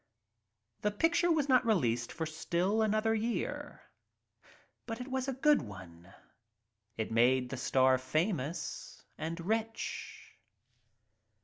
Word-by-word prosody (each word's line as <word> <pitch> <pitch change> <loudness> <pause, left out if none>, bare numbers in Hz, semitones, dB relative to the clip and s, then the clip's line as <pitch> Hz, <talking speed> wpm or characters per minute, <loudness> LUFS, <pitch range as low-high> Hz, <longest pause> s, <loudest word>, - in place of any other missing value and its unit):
The 210 - +2
picture 330 - +2
was 305 -3 +2
not 255 -2 +5
released 120 - +1
for 160 - -3
still 175 +6 0
another 215 +1 +2 1.7
But 225 0 -4
it 250 - -6
was 260 0 -2
a 270 - -1
good 295 +4 +4
one. 90 - -11 0.9
It 110 0 -3
made 125 +2 +3
the 135 - -3
star 130 0 +3
famous 155 +2 -2
— - - -41
and 165 +2 -4
rich. 225 +4 -3
170 Hz, 115 wpm, -32 LUFS, -, 1.7 s, not